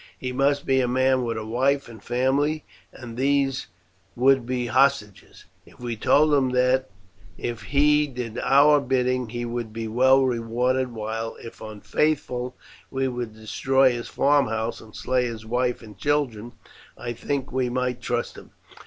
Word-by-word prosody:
He 125 - -4
must 140 +2 +1
be 130 0 +3
a 125 - 0
man 130 +1 +2
with 115 -2 -2
a 110 - -5
wife 135 +5 +1
and 115 -3 -12
family, 135 +6 0 0.3
and 120 -3 -10
these 135 0 +1 0.5
would 130 0 +3
be 125 -1 -1
hostages. 110 -5 0 0.2
If - - -20
we 120 -1 -4
told 150 +7 +3
him 135 -3 +3
that 125 +1 +2 0.5
if 120 -1 -4
he 150 +1 +3
did 120 -4 -5
our 145 +2 +5
bidding 125 -2 0
he 120 +1 -4
would 120 -1 -4
be 115 0 -5
well 130 +4 +4
rewarded, 125 +1 0
while 115 0 -4
if 115 - -11
unfaithful 125 +3 -2 0.3
we 135 0 -1
would 120 -3 -5
destroy 130 +4 +2
his 120 -1 -5
farmhouse 115 -6 +1
and 110 -1 -15
slay 125 0 0
his 115 -2 -6
wife 125 +1 -1
and 105 -2 -12
children, 120 -2 -1 0.4
I 120 - -5
think 135 +3 -3
we 130 -1 0
might 125 0 -2
trust 120 -1 -3
him. - - -17
125 Hz, 160 wpm, -24 LUFS, 115-135 Hz, 0.5 s, our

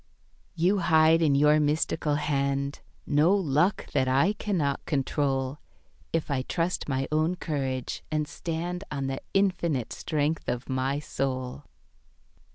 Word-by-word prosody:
You 180 +4 +2
hide 160 -1 +5
in 150 -4 +3
your 150 +2 +5
mystical 150 0 +1
hand 140 -1 -1 0.3
No 155 +7 +4
"luck" 175 0 +1
that 130 -2 +1
I 140 +10 +3
cannot 170 -10 -1
control, 135 -1 0 0.5
If 165 -2 -1
I 135 -2 +1
trust 165 +4 -2
my 135 0 0
own 155 +3 +2
courage 135 -7 -3
and 155 -1 -1
stand 175 +3 -4
On 140 -2 -3
the 135 0 -3
Infinite 170 - +1
strength 155 0 -1
of 125 +1 -3
my 130 +1 0
soul. 135 -2 -3
150 Hz, 130 wpm, -27 LUFS, 135-165 Hz, 0.5 s, hide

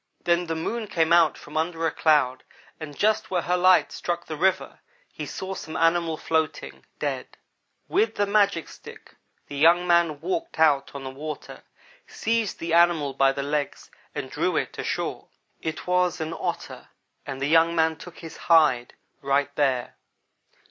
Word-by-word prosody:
"Then 175 0 +1
the 165 - -2
moon 220 +8 -3
came 165 -3 +1
out 170 -2 +4
from 150 - -13
under 165 +1 -1
a 160 - +1
cloud 145 -5 +2 0.4
and 145 -3 -8
just 215 +1 +1
where 180 -3 0
her 180 - +1
light 185 +1 +4
struck 175 0 -3
the 155 - -5
river, 190 +4 0 0.3
he - - -6
saw 190 0 -5
some 155 -4 -6
animal 165 -1 +2
floating 160 -1 -2
dead. - - -4 0.5
With 415 +5 +1
the 205 - +1
magic 200 -4 +2
stick - - -13 0.3
the 145 - -9
young 170 +4 +5
man 170 -3 +2
walked 345 -2 -3
out 145 -4 +3
on 140 - -6
the 130 - -6
water, 150 +2 -8 0.5
seized 225 -3 -1
the 165 0 -4
animal 170 -5 +3
by 135 0 +3
the 140 0 -4
legs 145 0 -3 0.2
and - - -5
drew - - 0
it - - -2
ashore. - - -3 0.3
It 160 0 -4
was 180 0 +1
an 160 +1 -3
Otter, - - -5 0.4
and 135 0 -5
the 135 - -1
young 165 +2 +4
man 160 -1 +2
took 180 +2 -12
his 165 -2 -10
hide, 150 -8 +4 0.3
right 140 +1 0
there. 130 -4 0
165 Hz, 170 wpm, -25 LUFS, 150-180 Hz, 0.5 s, young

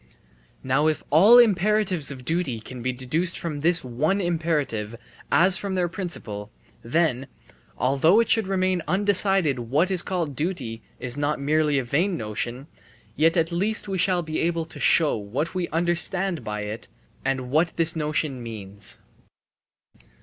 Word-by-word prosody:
Now 135 +4 +2
if 155 - 0
all 200 +11 +7
imperatives 210 - +3
of 130 -3 -7
duty 160 -7 -1
can 125 +3 -9
be 130 +2 -1
deduced 150 +8 -1
from 155 -4 -4
this 165 +3 +2
one 145 +11 0
imperative 150 - -1 0.4
as 185 +3 +4
from 195 -2 -3
their 180 -1 +1
principle, 145 - -5 0.3
then, 135 0 0 0.5
although 140 - +3
it 230 - +2
should 220 -4 +2
remain 185 -2 0
undecided 195 -7 +2
what 145 +11 0
is 185 -2 +4
called 170 -8 -3
duty 140 -9 -3 0.2
is 125 +2 -4
not 145 0 -1
merely 150 +1 +1
a 135 - 0
vain 170 +9 0
notion, 120 +4 -4 0.5
yet 165 +3 +3
at 165 +1 +1
least 205 +6 -1
we 190 -2 -2
shall 180 -1 +2
be 155 0 -3
able 165 -1 0
to 160 - -12
show 160 -3 +4
what 115 +10 -3
we 180 -2 -2
understand 175 +2 0
by 105 0 -4
it 105 +2 -6 0.4
and 130 -2 -2
what 160 +3 +2
this 165 0 +1
notion 150 -4 -2
means. 105 -3 -7
160 Hz, 155 wpm, -24 LUFS, 130-180 Hz, 0.5 s, all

